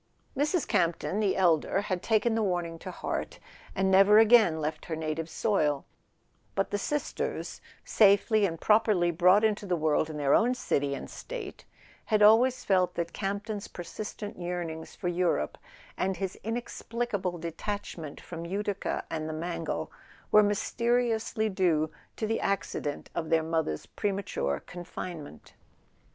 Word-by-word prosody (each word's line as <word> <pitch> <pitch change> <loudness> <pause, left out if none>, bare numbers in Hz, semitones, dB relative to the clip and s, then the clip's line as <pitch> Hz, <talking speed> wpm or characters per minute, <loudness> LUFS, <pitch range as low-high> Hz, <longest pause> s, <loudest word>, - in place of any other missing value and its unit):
Mrs. 300 +4 +1
Campton 170 +4 +1
the 205 -3 +1
elder 175 +1 +3
had 185 -3 -2
taken 225 +2 +2
the 225 - +1
warning 175 -4 -1
to - - -7
heart, - - -4 0.4
and 190 0 +2
never 195 +2 +7
again 220 -7 +6
left 155 0 -3
her 165 - -3
native 160 +1 -3
soil; 150 -11 0 0.7
but 195 - 0
the 205 - 0
sisters, 295 +7 -3 0.2
safely 210 +1 +4
and 165 -2 -6
properly 210 -5 +3
brought 180 +5 +5
into 215 -2 +1
the 180 - +1
world 155 -1 +1
in 155 - -6
their 145 -1 +2
own 245 +2 +4
city 140 - 0
and - - -7
State, 445 -6 -8 0.4
had 215 -2 +3
always 250 +4 +5
felt 185 -2 +2
that 170 -1 -3
Campton's 200 +1 -3
persistent 205 +3 -7
yearn¬ 175 -1 -3
ings 160 0 -9
for - - -4
Europe, 175 - 0 0.4
and 190 -1 -1
his 190 +1 -3
inexplicable 225 -4 -3
detachment 170 -2 -5
from 165 -1 -8
Utica 200 +3 -2
and 155 -1 -3
the - - -3
Mangle, 165 +1 -3 0.4
were 210 - +8
mysteriously 225 +1 +1
due 170 -6 +1 0.2
to 220 - -2
the 225 +1 0
accident 165 -6 -2
of 160 -2 -3
their 165 -1 +3
mother's 160 - -1
premature 190 - -2
confinement. 175 - -8
190 Hz, 145 wpm, -29 LUFS, 165-215 Hz, 0.7 s, were